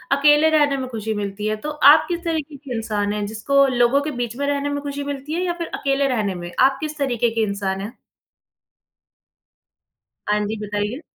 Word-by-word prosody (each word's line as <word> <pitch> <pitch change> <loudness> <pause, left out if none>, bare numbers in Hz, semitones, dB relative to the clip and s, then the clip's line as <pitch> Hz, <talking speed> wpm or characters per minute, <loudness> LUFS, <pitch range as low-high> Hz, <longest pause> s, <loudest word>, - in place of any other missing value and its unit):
अकेले 295 +2 +5
रहने 290 -3 +3
में 260 -1 -4
खुशी 220 -2 -3
मिलती 205 0 -4
है। 215 - 0
तो - - -1
आप 300 +1 +6
किस 345 0 -3
तरीके 310 -3 -3
के 270 -3 -7
इंसान 210 -2 -1
हैं, 210 -1 -2
जिसको 275 +7 +2
लोगों 250 +2 +3
के 300 +1 -3
बीच 235 0 -3
में 280 +1 -2
रहने 285 0 0
में 285 0 -3
खुशी 285 0 -4
मिलती 285 +2 -5
है 350 - -1
या 345 - 0
फिर 335 - -4
अकेले 275 0 +1
रहने 215 -7 -1
में? 175 0 -7
आप 270 +1 +4
किस 310 0 -5
तरीके 245 -5 +1
के 225 - +1
इंसान 200 -2 -2
हैं? 215 +5 -6 2.3
हाँ 210 0 +2
जी, 220 +2 -3
बताइए। 205 +7 -3
270 Hz, 200 wpm, -21 LUFS, 215-285 Hz, 2.3 s, आप